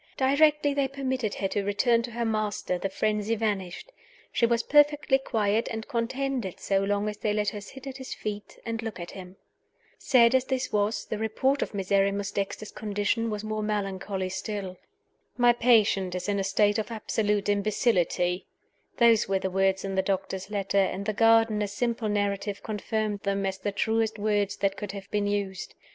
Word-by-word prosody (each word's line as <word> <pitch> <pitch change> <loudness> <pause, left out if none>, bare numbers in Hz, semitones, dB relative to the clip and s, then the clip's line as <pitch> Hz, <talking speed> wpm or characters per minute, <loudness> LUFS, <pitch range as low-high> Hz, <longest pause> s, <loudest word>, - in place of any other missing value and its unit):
Directly 290 +2 +3
they 280 -1 +1
permitted 260 -5 -2
her 195 - -1
to 205 - -1
return 230 +4 +2
to 235 - -5
her 235 0 -3
master 215 -4 -1
the 195 - -2
frenzy 210 +2 0
vanished: 205 - -3 0.4
she 235 - +2
was 230 0 +1
perfectly 295 -2 +4
quiet 220 -3 0
and 225 0 -5
contented 245 -3 -2
so 195 -1 +1
long 200 +1 0
as 210 -1 -4
they 210 0 -1
let 210 -1 +1
her 205 - -7
sit 265 +6 -11
at 270 -1 -6
his 260 -1 -7
feet 210 -1 -6
and 230 -1 -3
look 225 -4 -5
at 175 - -7
him. 185 -1 -10 0.6
Sad 235 -2 +5
as 260 0 +3
this 260 -1 -2
was, 205 0 0
the 215 - -4
report 260 +6 +1
of - - -3
Miserrimus 200 +1 +1
Dexter's 200 +1 -3
condition 210 +2 -1
was 210 -1 -4
more 215 0 -3
melancholy 195 -2 -2
still. 190 -1 -4 0.6
"My 245 -1 +5
patient 215 -6 +3
is 180 - -4
in 200 -1 0
a - - 0
state 205 +2 +2
of 220 - -3
absolute 210 -2 -1
imbecility" 200 -4 +1 0.5
those 230 -3 +5
were 195 - +2
the 190 0 -3
words 195 +1 +1
in 195 - -3
the 190 - +2
doctor's 190 0 -3
letter; 200 -1 0
and 195 0 0
the 215 - -1
gardener's 225 -2 +3
simple 230 0 -1
narrative 205 0 -1
confirmed 215 0 -2
them 195 0 -1
as 190 0 -2
the 205 +2 -2
truest 220 +2 0
words 205 -1 0
that 195 -1 0
could 205 -1 -5
have 200 -1 -9
been 205 -1 0
used. 200 -2 -3
210 Hz, 185 wpm, -27 LUFS, 195-230 Hz, 0.6 s, Sad